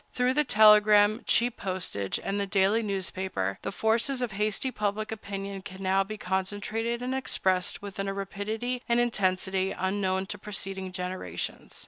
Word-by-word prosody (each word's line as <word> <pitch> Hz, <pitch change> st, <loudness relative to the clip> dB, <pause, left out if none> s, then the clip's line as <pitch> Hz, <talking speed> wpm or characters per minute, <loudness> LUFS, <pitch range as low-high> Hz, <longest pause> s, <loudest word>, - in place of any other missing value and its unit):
Through 250 Hz, +1 st, +2 dB
the 300 Hz, +2 st, +3 dB
telegram, 210 Hz, -1 st, +6 dB
cheap 240 Hz, 0 st, +2 dB
postage, 185 Hz, -, -2 dB
and 200 Hz, +1 st, -1 dB
the 200 Hz, -, -1 dB
daily 195 Hz, +3 st, +3 dB
newspaper, 190 Hz, -, -2 dB
the -, -, -3 dB
forces 235 Hz, +6 st, +1 dB
of 240 Hz, -, -2 dB
hasty 210 Hz, +6 st, -1 dB
public 210 Hz, -1 st, -2 dB
opinion 200 Hz, -2 st, -5 dB
can 190 Hz, 0 st, -9 dB
now 190 Hz, +1 st, +3 dB
be 215 Hz, +2 st, -7 dB
concentrated 205 Hz, +5 st, -2 dB
and 255 Hz, +1 st, -2 dB
expressed 190 Hz, -9 st, +1 dB
with 200 Hz, -1 st, -8 dB
a 195 Hz, 0 st, -1 dB
rapidity 215 Hz, +5 st, -3 dB
and 235 Hz, 0 st, +4 dB
intensity 190 Hz, -4 st, +1 dB
unknown 190 Hz, 0 st, 0 dB
to 205 Hz, +1 st, -5 dB
preceding 195 Hz, -2 st, -5 dB
generations. 185 Hz, 0 st, -4 dB
200 Hz, 150 wpm, -28 LUFS, 190-220 Hz, -, telegram